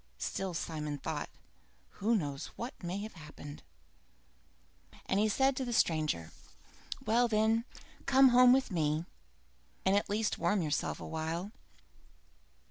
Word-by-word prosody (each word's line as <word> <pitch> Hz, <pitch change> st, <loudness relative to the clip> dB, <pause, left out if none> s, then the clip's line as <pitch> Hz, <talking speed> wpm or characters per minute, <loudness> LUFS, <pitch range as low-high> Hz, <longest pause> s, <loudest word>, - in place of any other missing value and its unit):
Still 185 Hz, -, -3 dB
Simon 150 Hz, -2 st, -3 dB
thought, -, -, -4 dB, 0.7 s
"Who 225 Hz, +4 st, +3 dB
knows 145 Hz, -8 st, -2 dB
what 235 Hz, +3 st, -6 dB
may 180 Hz, +1 st, -3 dB
have 220 Hz, -, -7 dB
happened?" 150 Hz, -3 st, -10 dB, 1.4 s
And 195 Hz, -, +1 dB
he 215 Hz, +1 st, +3 dB
said 265 Hz, +5 st, +3 dB
to 265 Hz, -, -1 dB
the 245 Hz, -, -3 dB
stranger: 155 Hz, -, +1 dB, 0.7 s
"Well 240 Hz, +2 st, +4 dB
then, 220 Hz, +1 st, +2 dB, 0.4 s
come 270 Hz, 0 st, +7 dB
home 250 Hz, 0 st, +7 dB
with 260 Hz, -3 st, +3 dB
me, 155 Hz, -1 st, 0 dB, 0.8 s
and 190 Hz, +1 st, +4 dB
at 205 Hz, -, +1 dB
least 210 Hz, +1 st, 0 dB
warm 205 Hz, -4 st, +2 dB
yourself 150 Hz, -2 st, -1 dB
awhile." 165 Hz, +4 st, -3 dB
195 Hz, 125 wpm, -32 LUFS, 155-230 Hz, 1.4 s, come